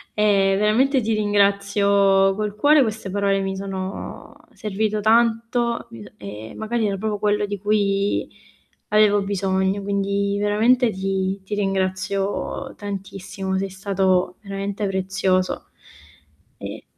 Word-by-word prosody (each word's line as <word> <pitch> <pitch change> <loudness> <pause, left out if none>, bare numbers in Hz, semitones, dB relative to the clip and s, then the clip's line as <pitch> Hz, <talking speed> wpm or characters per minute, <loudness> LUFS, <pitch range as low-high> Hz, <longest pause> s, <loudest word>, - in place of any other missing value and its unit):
e 200 -2 +3
veramente 255 +6 +3
ti 225 0 0
ringrazio 200 -1 +3
col 210 0 -3
cuore, 290 +6 +5
queste 220 -4 -2
parole 200 0 +1
mi 195 0 -3
sono 190 0 -6 0.2
servito 210 0 -2
tanto, 235 +1 +2
mhmm, 115 -2 -10
e 105 +2 -8
magari 220 0 -1
era 195 - -2
proprio 210 0 -2
quello 210 0 +1
di 205 0 -4
cui 200 0 0 0.6
avevo 210 -1 +4
bisogno, 195 0 0
quindi 200 0 -1
veramente 225 +4 +3
ti 190 0 -2
ti 205 +2 -4
ringrazio 195 +5 -2
tantissimo, 195 -1 -5
sei 195 0 -2
stato 190 -1 0
veramente 200 +1 -4
prezioso 190 -1 0 1.0
e - - -7
200 Hz, 115 wpm, -22 LUFS, 195-210 Hz, 1.0 s, cuore